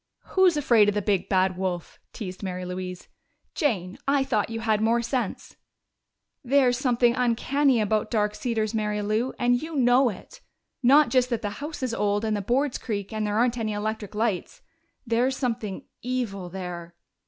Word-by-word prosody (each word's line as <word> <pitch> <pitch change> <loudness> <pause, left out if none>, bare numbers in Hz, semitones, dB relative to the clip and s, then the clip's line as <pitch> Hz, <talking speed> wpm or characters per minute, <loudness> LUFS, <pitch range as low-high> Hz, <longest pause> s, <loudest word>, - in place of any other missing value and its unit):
"'Who's 370 -4 +4
afraid 235 -7 +4
of 205 - -2
the 210 - +1
big, 200 -3 0
bad 185 -1 +2
wolf?'" 180 -2 -4
teased 185 -4 -7
Mary 185 -2 -4
Louise. 180 0 -6 0.5
"Jane, 200 - -1
I 275 0 +3
thought 245 -6 0
you 225 0 -4
had 220 -2 +1
more 230 +2 +2
sense!" 235 -3 -3 0.9
"There's 260 -1 +3
something 240 -2 +2
uncanny 255 +2 +2
about 215 0 0
Dark 210 -2 +1
Cedars, 220 -2 -2
Mary 210 -1 -1
Lou, 215 +5 0
and 245 +1 +2
you 320 +1 -6
know 250 -1 +4
it! 200 - -10 0.4
Not 280 +4 +6
just 255 -1 +2
that 235 -3 -2
the 205 - -2
house 295 -1 -5
is 250 -3 -1
old, 205 0 0
and 215 -1 0
the 205 - -2
boards 255 +6 0
creak, 205 -2 -4
and 215 -1 -1
there 205 0 -1
aren't 240 +1 +2
any 215 -1 -1
electric 210 0 -4
lights. 215 -4 -2 0.4
There's 245 +3 +1
something 225 -6 -3 0.2
evil 230 -7 -3
there." 175 -2 -7
225 Hz, 175 wpm, -26 LUFS, 205-250 Hz, 0.9 s, Not